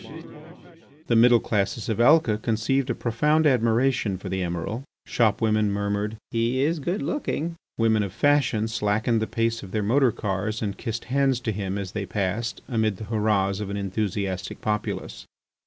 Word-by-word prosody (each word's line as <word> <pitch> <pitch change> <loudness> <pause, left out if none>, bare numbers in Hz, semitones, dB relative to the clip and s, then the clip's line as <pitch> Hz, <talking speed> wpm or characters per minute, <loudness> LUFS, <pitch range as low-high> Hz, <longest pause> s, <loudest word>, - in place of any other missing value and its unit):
The 120 - +1
middle 120 +1 +6
classes 105 +1 -1
of 110 -1 -1
Alca 120 -4 +5
conceived 120 +5 0
a 120 - 0
profound 150 +7 +1
admiration 120 -4 +2
for 95 - -7
the 95 0 -2
Emiral. 90 +7 -3 0.2
Shopwomen 110 -1 +2
murmured: 100 +1 -2
"He 115 +3 +1
is 160 +3 +1
good 175 +8 -2
looking." 170 - -2 0.2
Women 110 -1 +3
of 100 -2 -3
fashion 135 -3 +2
slackened 110 +1 0
the 110 - -1
speed 115 0 -1
of 95 - -9
their 105 -1 0
motor 125 +4 +3
cars 105 +1 -2
and 100 -2 -2
kissed 115 0 -4
hands 135 -1 +1
to 110 - -1
him 100 -1 -3
as 100 -2 -4
they 100 -3 -4
passed, 105 +3 -2
amidst 110 -5 0
the 110 - -7
hurrahs 100 -2 +1
of 105 -2 -4
an 100 - -3
enthusiastic 100 -1 -3
populace. 105 -1 -3
110 Hz, 165 wpm, -25 LUFS, 100-120 Hz, 0.2 s, middle